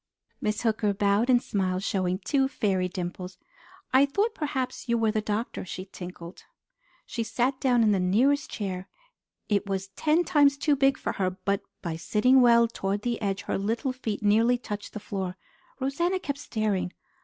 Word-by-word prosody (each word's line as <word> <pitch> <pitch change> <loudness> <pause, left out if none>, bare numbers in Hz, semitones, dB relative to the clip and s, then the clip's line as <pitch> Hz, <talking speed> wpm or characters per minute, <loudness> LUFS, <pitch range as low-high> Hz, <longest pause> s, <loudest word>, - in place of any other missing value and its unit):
Miss 210 +2 -1
Hooker 215 -3 +1
bowed 205 +4 +2
and 245 -1 +5
smiled, 185 -2 -1
showing 185 -3 0
two 270 +7 +1
fairy 195 -8 0
dimples. 180 0 -6 0.6
"I 270 +2 +6
thought 410 +10 0
perhaps 265 -5 -3
you 235 - +3
were 225 -1 +2
the 215 0 0
doctor," 215 +2 -3
she 185 +1 -6
tinkled. 180 -2 -10 0.6
She 235 - -4
sat 250 +4 0
down 245 -3 +3
in 215 - +4
the 195 - +2
nearest 250 +11 +2
chair. 190 -3 -4 0.6
It 205 -1 0
was 195 0 -2
ten 310 - +2
times 285 -5 +4
too 290 +1 +2
big 275 0 +3
for - - -2
her, 190 -3 0
but 195 +2 -2 0.2
by 165 -3 -3
sitting 250 +10 +4
well 235 -1 +6
toward 200 -2 -3
the 240 -2 -2
edge, 200 -1 -1
her 205 - -2
little 225 +6 -1
feet 220 -5 -4
nearly 225 +4 +4
touched 210 -4 -6
the 215 - -5
floor. 190 -3 -4 0.4
Rosanna 340 +8 0
kept 285 -5 -4
staring. 215 -8 -1
215 Hz, 175 wpm, -27 LUFS, 195-260 Hz, 0.6 s, I